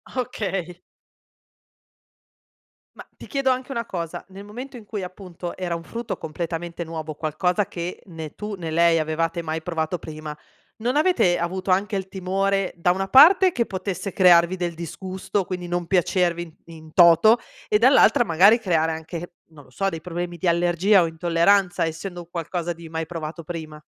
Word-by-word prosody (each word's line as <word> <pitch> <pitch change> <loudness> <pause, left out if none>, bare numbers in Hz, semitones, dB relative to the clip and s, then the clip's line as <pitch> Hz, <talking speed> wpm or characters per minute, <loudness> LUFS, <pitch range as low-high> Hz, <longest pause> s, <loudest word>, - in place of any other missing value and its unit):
Okay. 195 -8 -3 2.2
Ma, - - -12
ti - - -12
chiedo 275 -2 0
anche 255 +1 -3
una 235 -2 -3
cosa: 170 -5 -5
nel 195 +1 -10
momento 250 +5 -8
in 220 - -13
cui 205 -2 -5
appunto, 180 -1 -8
era 180 -2 -2
un 165 - -7
frutto 230 +6 -5
completamente 170 +2 -5
nuovo, 160 -1 -6
qualcosa 175 +6 0
che 175 +1 -6
né 160 -4 -8
tu 210 0 -5
né 165 -4 -6
lei 170 0 +4
avevate 165 +2 -1
mai 160 0 -3
provato 165 +1 -2
prima, 155 -1 -8 0.4
non 245 +5 -1
avete 300 - +3
avuto 185 +3 -3
anche 200 +3 +1
il 190 -1 -3
timore, 195 +1 -1
da 175 +1 +2
una 195 +1 -2
parte 360 - +7
che 235 -5 0
potesse 190 0 -4
crearvi 175 -1 +5
del 175 -2 -3
disgusto, 185 +4 -4
quindi 180 -1 -5
non 175 0 -2
piacervi 175 -2 +1
in 165 -1 -14 0.2
in 155 0 -15
toto 175 +7 +7 0.3
e 210 - +3
dall'altra 260 +1 +5
magari 195 +6 +5
creare 165 -6 +1
anche, 165 +2 -7 0.2
non 145 -3 -16
lo - - -21
so, 195 +10 -1
dei 165 -3 -6
problemi 175 0 -5
di 175 - -2
allergia, 175 +3 +3
o 165 - 0
intolleranza 175 +3 +2
essendo 175 +2 -5
un 170 - -14
qualcosa 170 +1 -3
di 165 0 -12
mai 160 0 -3
provato 165 0 -6
prima? 155 -2 -7
175 Hz, 170 wpm, -23 LUFS, 165-195 Hz, 2.2 s, parte